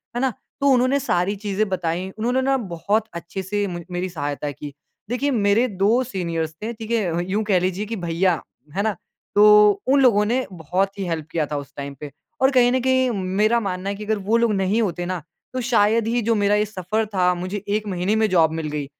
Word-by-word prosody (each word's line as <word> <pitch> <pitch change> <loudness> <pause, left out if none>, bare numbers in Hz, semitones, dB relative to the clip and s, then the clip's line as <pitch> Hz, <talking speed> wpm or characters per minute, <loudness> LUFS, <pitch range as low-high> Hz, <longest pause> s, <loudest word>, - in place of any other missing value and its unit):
है 240 - -1
ना? 265 -2 +1 0.3
तो 280 - +3
उन्होंने 255 +2 +3
सारी 185 -5 0
चीज़ें 205 +1 -1
बताईं। 180 0 -2
उन्होंने 245 +4 +1
ना 270 +1 +2
बहुत 205 +1 -1
अच्छे 170 +3 -6
से 205 +2 -1
म 175 -1 -5
मेरी 180 +1 -2
सहायता 145 -3 -3
की। 145 0 -9 0.4
देखिए 270 +4 0
मेरे 220 +1 +3
2 210 +5 +2
सीनियर्स 170 -8 -3
थे, 225 - -2
ठीक 225 0 -8
है? 175 -7 0
यूँ 215 +2 +1
कह 190 -4 +4
लीजिए 185 +3 -1
कि 225 +2 -4
भईया, 175 -2 0 0.3
है 200 - +1
ना? 215 -2 0 0.4
तो 210 0 +7 0.2
उन 275 +1 +4
लोगों 215 -5 +5
ने 250 +4 0
बहुत 185 +4 -2
ही - - -1
हेल्प 160 -3 -3
किया 160 -2 0
था 145 - -1
उस 140 0 -8
टाइम 140 0 -5
पे। 145 -2 -7 0.3
और 265 +1 +5
कहीं 245 -2 +4
न 260 - +2
कहीं 260 0 +2
मेरा 210 +5 +2
मानना 195 -2 -3
है 200 - -2
कि 210 +1 -7
अगर 220 0 0
वो 230 - +5
लोग 230 -2 +2
नहीं 195 +3 +1
होते 175 -4 -2
ना 185 -1 -3 0.3
तो 255 - -2
शायद 225 -2 +2
ही 240 +1 +1
जो 230 +1 +1
मेरा 205 0 +2
ये 210 - +2
सफ़र 215 +2 -2
था, 180 -1 +3
मुझे 185 +3 -5
1 210 +1 -1
महीने 185 +2 0
में 220 0 +3
जॉब 165 -3 +4
मिल 160 -1 -3
गई। 150 -1 -3
200 Hz, 225 wpm, -22 LUFS, 175-225 Hz, 0.4 s, तो